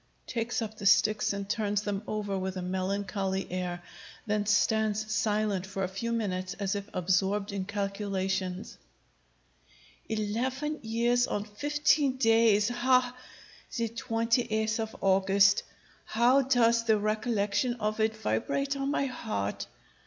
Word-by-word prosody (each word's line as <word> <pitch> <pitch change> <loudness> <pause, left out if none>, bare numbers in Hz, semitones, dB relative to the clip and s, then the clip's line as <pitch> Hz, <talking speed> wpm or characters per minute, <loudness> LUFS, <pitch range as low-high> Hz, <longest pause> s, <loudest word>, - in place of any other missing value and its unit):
[_Takes 235 0 -2
up 220 0 -7
the 200 - 0
sticks 215 +2 +4
and 200 -1 -4
turns 210 -1 0
them 200 -1 -2
over 205 -2 -2
with 190 0 -3
a - - -3
melancholy 190 +1 -2
air; 180 -1 -3 0.4
then 210 -1 -1
stands 215 0 +1
silent 210 -4 0
for 195 0 -3
a - - 0
few 195 +5 -4
minutes 185 -5 -2
as 195 -2 -2
if 200 0 -5
absorbed 190 +3 0
in 195 -2 -3
calculation._] 195 -2 -3 1.3
Eleven 255 +8 -2
years 240 +2 +1
and 205 +1 -3
fifteen 290 +3 +1
days! 225 -3 +4
Hah! 250 +1 +2 0.6
the 230 -1 0
twenty 230 +1 0
eighth 220 +1 0
of 220 0 -4
August! 195 +1 +4 0.4
How 245 +5 +4
does 235 -3 +3
the 220 -1 +4
recollection 215 +2 0
of 215 -2 -2
it 220 0 +1
vibrate 245 - -1
on 275 0 -2
my 280 -1 +1
heart! 220 - -3
215 Hz, 135 wpm, -29 LUFS, 195-230 Hz, 1.3 s, sticks